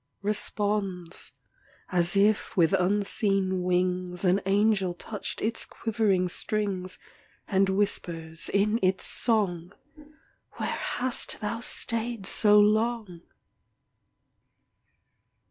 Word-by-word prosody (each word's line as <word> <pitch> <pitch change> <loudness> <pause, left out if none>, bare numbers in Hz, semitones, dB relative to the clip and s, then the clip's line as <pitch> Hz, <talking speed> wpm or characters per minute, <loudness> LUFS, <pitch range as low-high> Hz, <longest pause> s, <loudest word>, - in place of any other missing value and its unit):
Responds, 205 -3 -2 0.6
as 175 0 +1
if 205 +1 +1
with 165 -1 +3
unseen 195 0 0
wings, 180 0 -1
An 185 +2 +3
angel 195 -2 +2
touched 210 +3 -6
its 225 +1 -1
quivering 205 -5 0
strings; 190 -1 -3 0.5
And 195 -1 +2
whispers, 170 -5 -2
in 210 +3 +1
its 185 0 +1
song, 195 -6 0 0.8
"'Where - - -4
hast 250 0 +1
thou 215 +2 -3
stayed 230 -2 -1
so 210 +1 +5
long?" 215 -3 +1
195 Hz, 90 wpm, -27 LUFS, 180-215 Hz, 0.8 s, so